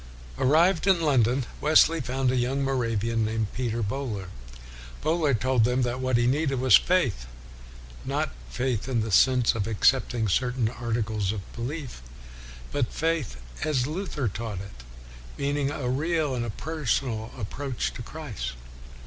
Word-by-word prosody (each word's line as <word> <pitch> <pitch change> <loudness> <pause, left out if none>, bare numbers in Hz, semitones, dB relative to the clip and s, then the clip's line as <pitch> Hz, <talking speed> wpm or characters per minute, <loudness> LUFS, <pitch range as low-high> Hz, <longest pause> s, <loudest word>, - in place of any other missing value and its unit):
1 - - +1
Arrived 165 +4 +4
in 190 -3 +5
London, 130 -5 +2 0.2
Wesley 155 +1 +5
found 130 +1 0
a - - 0
young 130 +3 0
Moravian 115 -4 0
named 110 -1 -2
Peter 120 -2 -2
Bohler. 105 -4 -3 0.7
Bohler 155 -3 +2
told 120 0 +2
him 125 +1 +1
that 125 +1 -1
what 130 -2 +1
he 120 - +2
needed 135 +1 +1
was 130 -4 +6
faith: 125 - +2 0.8
not - - -1 0.2
faith 125 - -2
in 120 -3 +1
the 110 0 -3
sense 125 +4 +4
of 105 -2 -2
accepting 115 +1 +2
certain 125 +3 +1
articles 110 -4 -2
of 105 -3 -7
belief, 125 - -5 0.7
but 140 -5 -1
faith 160 - -1 0.3
as 135 -5 +1
Luther 155 -4 -3
taught 105 -1 -4
it, 100 -11 -11 0.5
meaning 140 0 0
a 140 -3 -3
real 150 +2 0
and 120 -4 -3
per 160 +2 -5
sonal 115 -2 0
approach 130 +4 -3
to - - -7
Christ. 115 - -6
125 Hz, 150 wpm, -26 LUFS, 115-140 Hz, 0.8 s, was